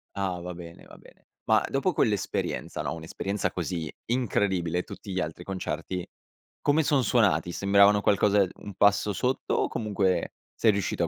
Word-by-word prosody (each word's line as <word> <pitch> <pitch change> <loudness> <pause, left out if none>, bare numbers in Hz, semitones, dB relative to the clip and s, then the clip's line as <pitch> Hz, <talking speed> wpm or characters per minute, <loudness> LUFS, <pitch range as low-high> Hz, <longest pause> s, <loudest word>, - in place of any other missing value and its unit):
Ah 95 -3 -2
va 90 +1 -6
bene, 85 -1 -11
va - - -14
bene. - - -20 0.2
Ma - - +4
dopo 145 +6 0
quell'esperienza, 105 -7 -1
no, - - -2
un'esperienza 90 +5 -3
così 85 -2 -3 0.2
incredibile, 95 -8 0
tutti 100 - -9
gli 95 - -1
altri 80 +2 -5
concerti 90 -1 -4 0.6
come 150 +2 +3
son 140 -3 +2
suonati? 100 -8 +2
Sembravano 100 +2 +4
qualcosa 100 0 +3 0.2
un 100 -2 -8
passo 100 +1 +3
sotto 125 +6 -1
o - - +1
comunque 100 -4 0 0.2
sei 110 - +4
riuscito 100 -3 -1
a - - +1
100 Hz, 155 wpm, -27 LUFS, 90-105 Hz, 0.6 s, Ma